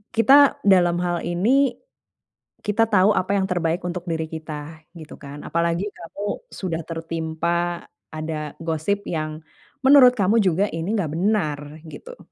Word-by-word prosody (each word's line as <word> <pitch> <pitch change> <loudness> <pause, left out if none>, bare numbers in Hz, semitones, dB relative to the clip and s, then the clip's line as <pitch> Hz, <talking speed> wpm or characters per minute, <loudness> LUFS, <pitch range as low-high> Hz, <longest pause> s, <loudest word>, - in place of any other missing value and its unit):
kita 275 +5 +5
dalam 180 -3 +4
hal 175 -1 -1
ini, 245 +11 +2 0.9
kita 215 +2 +1
tau 205 -1 +4
apa 200 +1 0
yang 195 - +1
terbaik 175 -2 -1
untuk 180 0 -5
diri 160 -1 -1
kita, 155 0 -8
gitu 160 -2 -11
kan. 145 +1 -10
Apalagi 170 +2 -1
kamu 205 - -7
sudah 170 -4 -4
tertimpa 165 +1 -3 0.2
ada 155 -1 -5
gosip 170 +5 -1
yang 155 -1 -4 0.4
menurut 265 -2 +7
kamu 210 +2 +3
juga 190 0 +2
ini 165 +7 -2
gak 160 -8 -2
benar, 175 -5 0 0.2
gitu. - - -11
175 Hz, 135 wpm, -22 LUFS, 160-205 Hz, 0.9 s, menurut